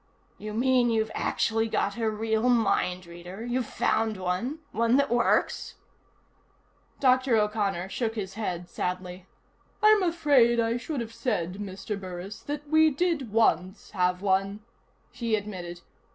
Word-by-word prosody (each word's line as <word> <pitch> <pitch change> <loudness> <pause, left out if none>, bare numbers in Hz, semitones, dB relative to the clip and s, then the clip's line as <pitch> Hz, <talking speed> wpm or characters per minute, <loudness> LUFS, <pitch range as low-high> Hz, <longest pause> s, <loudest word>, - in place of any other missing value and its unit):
"You 210 0 -6
mean 250 0 +3
you've 220 -1 0
actually 225 0 0
got 200 -2 -1
a 225 -2 0
real 220 +2 0
mind 190 -6 +1
reader? 175 +5 -9
You've 245 -1 -1
found 220 -2 0
one? 185 - -2
One 230 +2 +2
that 280 -2 +1
works?" 240 0 +1 1.2
Dr. 255 -2 +3
O'Connor 210 -4 0
shook 225 +1 -2
his 195 -3 -4
head 180 -5 -4
sadly. 180 0 -4 0.6
"I'm 430 -1 +6
afraid 290 -9 +3
I 230 +1 +1
should 270 +1 -4
have 230 -1 -7
said, 200 -6 -2
Mr. 200 +1 -5
Burris, 185 +2 -7
that 295 0 -5
we 315 +1 +5
did 295 - -1
once 200 -3 +1
have 180 -1 0
one," 195 +1 +1 0.5
he 230 -2 -1
admitted. 180 -5 -6
220 Hz, 140 wpm, -27 LUFS, 190-245 Hz, 1.2 s, I'm